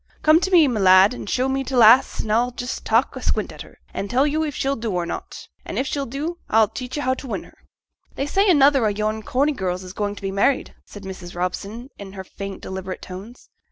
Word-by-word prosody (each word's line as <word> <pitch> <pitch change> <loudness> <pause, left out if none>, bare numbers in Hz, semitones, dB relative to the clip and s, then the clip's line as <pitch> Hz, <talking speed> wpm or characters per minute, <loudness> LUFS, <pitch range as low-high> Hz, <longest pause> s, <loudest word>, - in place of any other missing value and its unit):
Come 310 +1 +6
t' 370 - -1
me, 340 -5 +6
my 240 -5 -1
lad, 190 +2 +6
and 225 - -7
show 255 +1 +1
me 270 0 -1
t' 265 0 -4
lass, 235 +1 +6
an' 215 - -4
a'll 235 +3 +2
just 245 0 -5
tak' - - +2
a - - -6
squint - - -1
at - - -10
her, - - -13 0.2
an' 200 - -3
tell 255 +6 +2
yo' 300 +2 0
if 300 -3 -2
she'll 275 +1 0
do 230 -2 -4
or 180 -3 -1
not; - - -7 0.2
an' - - -6
if 265 - 0
she'll 275 0 -3
do, 305 +8 -4
a'll 220 -1 +4
teach 255 +2 -6
yo' 290 - -2
how 260 - +2
to 260 - -8
win - - -4
her.' - - -21 0.5
'They 275 - -2
say 395 +7 +2
another 280 -5 +5
o' - - +3
yon 215 +1 -2
Corney 275 +7 +1
girls 185 -7 -3
is 185 0 -9
going 205 -1 -2
to - - -11
be 195 - -2
married,' 205 +8 +1
said 205 - -11
Mrs. 185 -2 -8
Robson, 200 +7 -4
in 195 -1 -9
her 190 -1 -7
faint 195 +1 -8
deliberate 190 0 -6
tones. 195 +6 -10
230 Hz, 250 wpm, -22 LUFS, 195-275 Hz, 0.5 s, Come